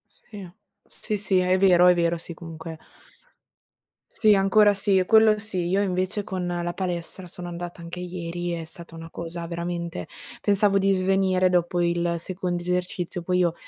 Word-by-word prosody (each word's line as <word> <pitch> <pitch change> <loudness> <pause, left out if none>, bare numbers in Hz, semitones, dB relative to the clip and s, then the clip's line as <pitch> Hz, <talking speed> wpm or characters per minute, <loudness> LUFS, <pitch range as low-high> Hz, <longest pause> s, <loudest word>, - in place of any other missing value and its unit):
Sì, 200 -4 -11 0.4
sì, 210 - -5
sì, 195 -1 +1
è 185 +1 +2
vero, 180 -2 +5
è 180 - +6
vero. 170 0 +1
Sì, 170 - -5
comunque 165 -1 -9 1.3
Sì, 215 -2 +4
ancora 205 +2 +4
sì, 195 -1 +3
quello 220 -1 +5
sì. 190 -4 -2
Io 195 +2 +2
invece 185 +1 -1
con 185 -2 -4
la 175 0 -2
palestra 180 0 -4
sono 175 0 -8
andata 175 0 -7
anche 170 +1 -7
ieri, 175 -1 -4
è 170 -1 -3
stata 170 +1 -11
una 165 0 -9
cosa 170 0 -6
veramente 170 - -4 0.3
pensavo 200 0 +2
di 195 0 +2
svenire 185 -1 +2
dopo 175 0 +1
il 170 0 0
secondo 180 0 -3
esercizio. 180 0 -3
Poi 180 +1 0
io, 175 -2 +2
180 Hz, 160 wpm, -25 LUFS, 170-190 Hz, 1.3 s, è